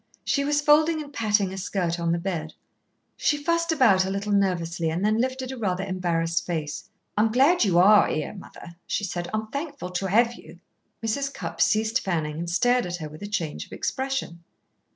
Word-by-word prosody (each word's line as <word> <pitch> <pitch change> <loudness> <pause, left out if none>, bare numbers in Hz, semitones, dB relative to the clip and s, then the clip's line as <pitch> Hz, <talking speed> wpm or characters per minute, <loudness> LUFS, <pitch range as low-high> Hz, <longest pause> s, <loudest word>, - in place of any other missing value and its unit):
She 280 - +1
was 290 +1 +1
folding 310 +2 +4
and 290 -1 -8
patting 210 -5 +1
a 190 - -5
skirt 180 -3 -2
on 170 0 0
the 170 - +1
bed. 170 -3 -4 0.6
She 295 - +1
fussed 335 +3 0
about 230 -12 +4
a 190 - -3
little 200 +2 -3
nervously 175 -4 +1
and 170 +5 -1
then 215 +1 +2
lifted 260 +1 -2
a 265 - -6
rather 190 -3 -1
embarrassed 170 -3 -1
face. 155 -4 -4 0.3
"I'm 220 +1 +2
glad 275 +8 +4
you 185 -5 +2
are 200 +4 +7
here, 155 - -3
mother," 175 -3 -12
she - - -1
said. 175 -2 -3
"I'm 215 0 -2
thankful 280 - -5
to 180 +2 -2
have 230 +5 +3
you!" - - -14 0.5
Mrs. 275 +5 -1
Cupp - - -5
ceased 220 +2 +2
fanning 160 -4 -2
and 170 0 -3
stared 245 +5 +2
at 175 - -3
her 155 -3 -6
with 155 +1 -12
a 205 - -5
change 170 -7 -3
of - - -13
expression. 265 -11 -3
200 Hz, 195 wpm, -25 LUFS, 175-255 Hz, 0.6 s, are